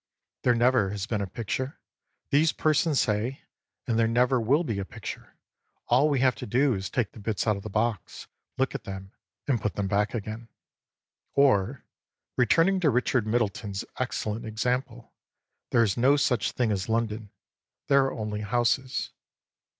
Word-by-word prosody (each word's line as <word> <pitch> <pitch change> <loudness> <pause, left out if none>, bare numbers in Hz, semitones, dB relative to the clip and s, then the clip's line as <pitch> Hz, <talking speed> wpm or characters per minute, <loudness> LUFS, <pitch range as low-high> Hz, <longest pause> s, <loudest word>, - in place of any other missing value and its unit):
There 125 -1 +3
never 120 -4 +3
has 100 -1 -3
been 105 -2 -2
a 100 - -2
picture, 120 +7 -4 0.5
these 155 +3 +4
persons 155 -1 +2
say, 110 +5 0 0.4
and 115 -1 0
there 115 - +4
never 125 +2 +2
will 140 +9 +3
be 115 -10 -2
a - - -1
picture; - - -8 0.5
all 130 +5 +4
we 140 -4 +1
have 130 -1 +4
to - - -6
do 130 +5 +3
is 95 -2 -3
to - - -13
take 120 -5 0
the - - -13
bits 105 0 -2
out 110 -2 +2
of 100 - -7
the 110 - -7
box, 110 -1 -2 0.3
look 135 0 0
at - - -6
them, 95 -1 -7 0.4
and 130 -5 +1
put 105 - -2
them 100 -1 -1
back 105 +3 0
again. 110 +1 -5 0.9
Or, 130 -2 +3 0.5
returning 165 +9 +3
to 165 -5 +3
Richard 125 -2 +1
Middleton's 105 -3 -1
excellent 110 +1 -2
example: 120 +2 -3 0.6
there 115 - +4
is 100 -4 0
no 130 +4 +5
such 125 -6 +1
thing 120 -3 +1
as 95 -1 -2
London, 110 -2 -1 0.6
there 140 -1 +4
are 135 - -1
only 105 -1 -4
houses. 120 +4 0
115 Hz, 170 wpm, -27 LUFS, 105-130 Hz, 0.9 s, no